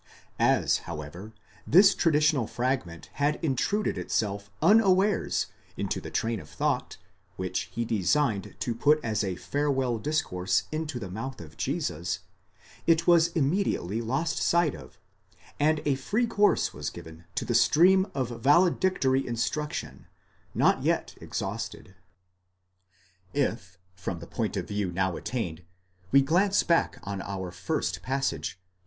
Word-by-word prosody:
ΑΒ, - - +3
however, 85 +6 -7 0.4
this 195 +5 +7
traditional 150 -6 +2
fragment 120 -10 -2
had 145 +1 +3
intruded 200 - 0
itself 100 -1 -2
unawares 200 -1 +3 0.3
into - - -2
the - - -7
train 115 -1 -1
of 75 - -12
thought, - - -1 0.4
which 90 0 -3
he 115 - -2
designed 110 - 0
to 110 +4 -1
put 150 +6 +3
as 110 -2 0
a 95 -2 -2
farewell 135 0 -1
discourse 105 -10 0
into 155 -3 -3
the 95 -6 -6
mouth 120 +7 -5
of 80 -2 -11
Jesus, 90 - -2 0.7
it 165 0 +4
was 170 -1 +6
immediately 140 - 0
lost 135 +8 -1
sight 170 - +3
of, 65 -6 -12 0.6
and 155 +1 +2
a 145 - +3
free 205 - 0
course 210 -3 +2
was - - -4
given 80 -1 -11
to - - -1
the - - -1
stream 190 +4 +5
of 130 -3 -1
valedictory 145 -2 +3
instruction, 115 - -3 0.5
not - - +3
yet - - 0
exhausted. 95 - -5 1.4
If, 90 0 -1 0.2
from 90 -1 -5
the 85 - -9
point - - -3
of - - -3
view 100 -3 -2
now 95 0 0
attained, 90 -9 -4 0.5
we 140 0 +6
glance 190 +7 +3
back 170 -1 +2
on 100 0 -4
our 95 -3 -5
first 95 - -2
passage, 110 - -2
iv. 90 0 -44
125 Hz, 135 wpm, -28 LUFS, 95-155 Hz, 1.4 s, this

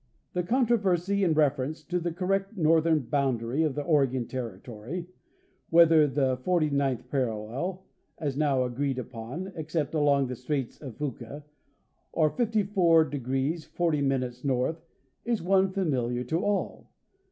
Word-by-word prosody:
The 180 - 0
controversy 200 -3 +1
in 165 -4 +2
reference 150 +1 +1
to 180 +3 -2
the 170 0 -2
correct 195 +4 -1
northern 160 -1 +3
boundary 130 0 0
of 155 -4 +1
the 145 - -2
Oregon 135 -6 +1
territory, 120 - -6 0.6
whether 165 -2 +6
the 135 -2 +1
forty 155 +2 +1
ninth 140 -3 0
parallel, 130 - -2 0.3
as 145 -4 -3
now 140 -3 +2
agreed 130 +2 -2
upon, 130 +10 -6
except 155 -2 -2
along 145 -3 +3
the 125 0 -4
straits 130 +1 -3
of 130 -7 -8
Fuca, 140 0 -5 0.7
or 155 -2 +3
54° 220 -5 0
40° 145 - +1
north, 135 +4 0 0.4
is 235 -6 -1
one 190 +1 +3
familiar 125 - -1
to 160 +8 -1
all. 205 -1 -2
150 Hz, 130 wpm, -28 LUFS, 130-175 Hz, 0.7 s, whether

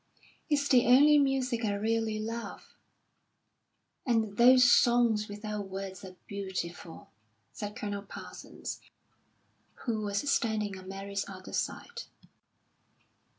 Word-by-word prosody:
"It's 285 -1 +1
the 250 -4 +4
only 290 +4 +7
music 265 -4 0
I 205 -2 0
really 220 +1 -1
love." 230 +2 -6 1.3
"And 225 -5 0
those 250 +2 +7
'Songs 240 -3 +4
Without 210 -1 -5
Words' 190 -1 -6
are 185 -1 -10
beautiful," 185 -4 -6 0.4
said 205 0 -6
Colonel 205 -3 -4
Parsons, 200 - -9 1.0
who 225 -3 -1
was 205 +6 -2
standing 220 -7 0
on 185 - -13
Mary's 195 +1 -4
other 185 -1 -10
side. - - -4
215 Hz, 110 wpm, -30 LUFS, 200-240 Hz, 1.3 s, only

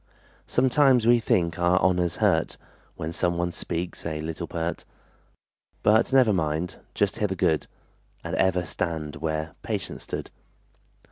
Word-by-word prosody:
Sometimes 130 -2 +4
we 120 +1 +6
think 85 -6 +1
our 90 +1 +3
honor's 90 -3 +2
hurt - - +1 0.4
When 80 +1 -5
some 85 +1 0
one 85 0 0
speaks 85 +1 -4
a 80 -2 -3
little 80 +2 -4
pert; 85 0 -3 1.0
But 110 +5 +4
never 130 -5 +5
mind, 80 0 -1 0.2
just - - +1
hear 105 - +2
the 95 - -3
good, 80 -3 +1 0.6
And - - -5
ever 90 -2 +2
stand 80 -4 -3
where 80 0 -3
Patience - - -4
stood. - - -6
85 Hz, 140 wpm, -26 LUFS, 80-95 Hz, 1.0 s, we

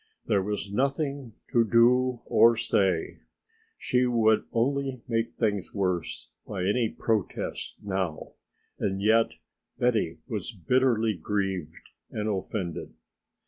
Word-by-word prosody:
There 100 - +2
was 105 0 -3
nothing 140 +1 -1 0.2
to 120 - +4
do 120 +2 +3
or 115 0 +5
say, 95 -6 +1 0.6
she 125 0 +1
would 110 -3 +3
only 135 +1 0
make 115 -1 -1
things 105 -4 -1
worse 90 -4 -2 0.2
by 95 -3 -3
any 110 +4 +2
protest 110 -4 -2
now, 95 -5 -3 0.5
and 95 -1 -1
yet 110 +3 +3 0.4
Betty 110 -9 +1
was 110 -2 -4
bitterly 115 +3 +2
grieved 95 -5 -3 0.2
and 105 0 -3
offended. 95 -3 -3
110 Hz, 110 wpm, -27 LUFS, 95-120 Hz, 0.6 s, or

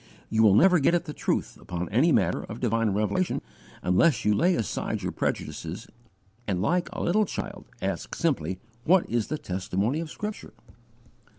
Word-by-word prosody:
_ - - -26 0.3
You 110 - +3
will 105 -3 +6
never 180 - +6
get 160 +5 +3
at 175 - 0
the 150 - -6
truth - - -2
upon 90 0 -4
any 135 +10 +3
matter - - +2
of 110 +2 -8
divine 115 -2 +1
revelation 105 - 0 0.4
unless 95 - +3
you 105 - +4
lay 175 - +3
aside 110 - -2
your - - -1
prejudices - - -3 0.6
and 95 -4 0
like 175 - +1
a - - -4
little 210 +5 +3
child - - -6 0.2
ask - - -3
simply 90 +5 0 0.3
what 180 +5 +4
is 115 -2 0
the 155 - -2
testimony 95 - -1
of 165 -1 -4
Scripture." 210 +5 -6
120 Hz, 175 wpm, -27 LUFS, -, 0.6 s, will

